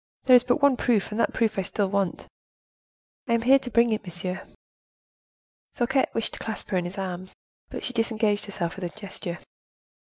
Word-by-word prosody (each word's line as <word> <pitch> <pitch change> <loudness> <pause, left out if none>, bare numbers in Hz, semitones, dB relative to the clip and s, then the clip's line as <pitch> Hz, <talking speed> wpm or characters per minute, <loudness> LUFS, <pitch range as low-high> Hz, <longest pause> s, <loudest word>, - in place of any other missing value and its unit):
there 255 - +7
is 245 - +7
but 250 +3 0
one 280 -2 +6
proof, 225 -4 +1
and 210 - -3
that - - +2
proof 220 -4 0
I - - +2
still 200 +1 -1
want." 195 -2 -1 1.0
"I 235 - +1
am 230 0 +2
here 270 +3 +6
to 250 - -6
bring 235 0 +4
it, 215 - -2
monsieur." 180 +1 -5 1.3
Fouquet 265 +2 +2
wished 225 -1 0
to - - -6
clasp 220 -1 -5
her 190 - +2
in 175 - -4
his 175 +3 -6
arms, 185 -1 -5 0.3
but - - -6
she 255 - -3
disengaged 220 -2 +1
herself 175 -4 -3
with 190 - -4
a - - -3
gesture. 190 -3 -5
215 Hz, 195 wpm, -26 LUFS, 190-240 Hz, 1.3 s, there